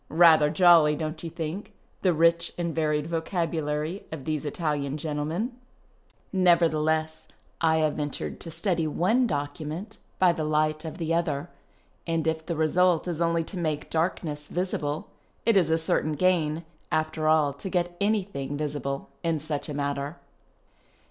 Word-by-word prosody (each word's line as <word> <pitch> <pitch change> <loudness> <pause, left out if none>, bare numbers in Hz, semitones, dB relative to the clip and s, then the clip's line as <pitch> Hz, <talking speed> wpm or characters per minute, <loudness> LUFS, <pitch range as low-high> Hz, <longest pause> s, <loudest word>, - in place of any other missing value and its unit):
(Rather 160 -2 +6
jolly, 165 -2 +6
don't 155 +1 -4
you 165 - -4
think, 175 +7 -5 0.3
the 185 - +4
rich 170 +1 +3
and 170 -2 -2
varied 150 -2 0
vocabulary 165 0 -2
of 155 -4 -6
these 155 -1 -2
Ralian 145 -2 -1
gentlemen 155 - -2 0.4
?) - - -37
Nevertheless, 160 -3 +2 0.4
I 160 -1 +4
have 150 - -1
ventured 145 -1 -4
to 165 - -7
study 170 0 0
one 220 - +2
document 155 +6 -4 0.2
by 180 -2 +5
the 165 -2 -3
light 155 +1 +1
of 160 - -6
the 165 -2 -1
other; 165 -2 -1 0.6
and, 165 -1 0
if 160 0 0
the 170 +1 -3
result 170 +2 +3
is 170 -2 -2
only 170 0 +2
to 185 - -8
make 155 -4 -2
darkness 160 -3 -1
visible, 155 -5 -2 0.3
it 230 -1 +4
is 175 -5 +4
a 160 - +3
282 155 -1 0
FUTURIST - - -19
DANCING 185 -4 +3
certain 150 - -2
gain, 165 +1 -8 0.3
after 155 0 0
ail, 155 -2 +4
to 145 +7 -6
get 175 -1 -1
any 205 -1 +2
tiling 145 -6 -5
visible 145 -2 -3
in 165 -1 0
such 145 -1 -4
a - - -3
matter. 140 +2 -2
160 Hz, 165 wpm, -27 LUFS, 150-170 Hz, 0.6 s, Rather